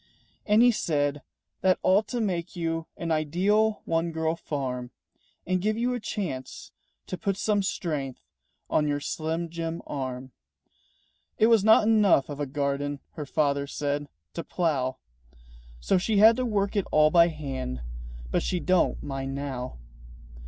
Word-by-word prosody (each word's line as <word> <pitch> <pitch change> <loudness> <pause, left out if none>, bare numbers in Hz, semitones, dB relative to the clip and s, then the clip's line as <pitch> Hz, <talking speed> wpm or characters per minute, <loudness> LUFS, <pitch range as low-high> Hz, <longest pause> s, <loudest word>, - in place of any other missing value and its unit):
And 215 +2 +5
he 245 - +7
said, 145 -8 0 0.4
"That 185 -1 +4
ought 200 +3 +4
to 245 - -3
make 185 -4 -2
you 165 -1 -2
An 165 -1 -3
ideal 190 +8 +1
one 165 +1 0
girl 160 0 -1
farm, 130 -6 -4 0.6
And 185 0 0
give 215 +3 0
you 245 +2 0
a 245 - -2
chance 150 - -5 0.3
to 185 - -6
put 195 -1 -1
some 205 -1 +1
strength 150 -8 -3 0.4
On 150 - +1
your 145 0 0
slim 160 +3 -3
jim 165 0 -4
arm." 130 -2 -5 1.1
It 215 - +5
was 220 -4 +4
not 220 0 +6
enough 210 -11 +4
of 145 -1 -6
a 145 - -1
garden, 140 +1 -2
Her 150 -2 -7
father 140 -1 +1
said, 145 0 -2 0.2
to 170 - -4
plough; 140 -7 -1 0.8
So 185 - +2
she 210 +3 0
had 220 +3 +8
to 255 - 0
work 200 -2 0
it 200 - 0
all 155 0 +5
by 170 0 +6
hand, 135 - -5 0.5
But - - +2
she 180 - -1
don't 185 0 +1
mind 135 -1 -4
now. 130 - -5
165 Hz, 155 wpm, -27 LUFS, 140-195 Hz, 1.1 s, had